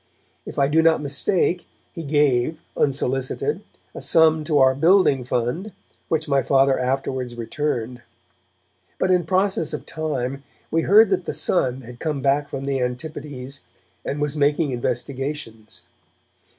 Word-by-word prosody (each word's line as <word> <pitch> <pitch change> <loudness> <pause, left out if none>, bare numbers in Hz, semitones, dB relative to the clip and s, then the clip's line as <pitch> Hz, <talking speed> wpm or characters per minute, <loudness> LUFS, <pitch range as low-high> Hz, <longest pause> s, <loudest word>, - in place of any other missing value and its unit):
If - - -8
I 140 - +3
do 155 +3 +3
not 165 0 +4
mistake, 165 +5 0 0.3
he 165 - -6
gave, 145 -1 +2 0.2
unsolicited, 135 - -1 0.3
a - - -8
sum 160 -1 +4
to 155 -2 +1
our 130 -1 +5
building 160 -2 +4
fund, 125 - -2 0.3
which 160 - -1
my 140 -1 +2
Father 135 0 +3
afterwards 130 -1 -2
returned. 120 0 -3 1.0
But 185 - +1
in 180 -2 +2
process 185 -2 +1
of - - -5
time 140 -4 -3 0.3
we 165 - +2
heard 205 +4 +6
that 185 -2 0
the - - -3
son 130 -7 0
had 120 0 -12
come 155 -3 -2
back 140 +2 +1
from 135 0 -5
the 135 -1 -1
Antipodes, 135 +1 -5 0.4
and 145 - -3
was 150 0 -1
making 145 0 +1
investigations. 125 -2 -4
140 Hz, 140 wpm, -22 LUFS, 130-160 Hz, 1.0 s, heard